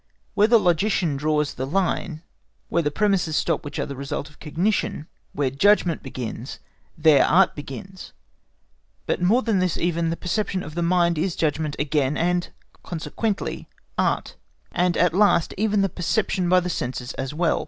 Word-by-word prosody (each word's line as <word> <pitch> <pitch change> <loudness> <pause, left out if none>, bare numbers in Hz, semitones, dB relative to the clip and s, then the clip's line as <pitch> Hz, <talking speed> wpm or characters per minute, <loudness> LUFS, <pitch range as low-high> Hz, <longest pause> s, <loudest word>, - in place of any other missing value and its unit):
Where 210 - +4
the 230 +1 +6
logician 175 -4 +1
draws 150 +1 0
the 130 +1 -4
line, 170 -1 -1 0.5
where 170 - +2
the 145 - 0
premises 185 -1 +1
stop - - 0
which 145 - -7
are - - -1
the 140 - -6
result 140 +2 -5
of - - -23
cognition—where 155 -5 -2
judgment 175 +2 +3
begins, 125 -1 -6 0.4
there 155 -3 +5
Art 185 +1 +4
begins. 185 +7 -9 0.9
But - - -1
more 220 +9 +3
than 220 -5 +1
this 185 -3 0
even 170 -1 0
the 165 - -2
perception 190 0 -2
of 150 - -8
the 175 - -2
mind 170 -1 +2
is 175 +1 -1
judgment 155 -1 -1
again, 145 -1 0
and 175 +1 0 0.3
consequently 195 +5 -3 0.3
Art; - - -1 0.3
and 180 -1 +1
at 175 -2 +3
last, 195 -3 +3
even 210 0 +1
the - - +3
perception 185 0 -1
by 185 0 +5
the 180 - -4
senses 125 -3 -4
as 135 0 -4
well. 170 +1 +1
170 Hz, 165 wpm, -23 LUFS, 150-190 Hz, 0.9 s, the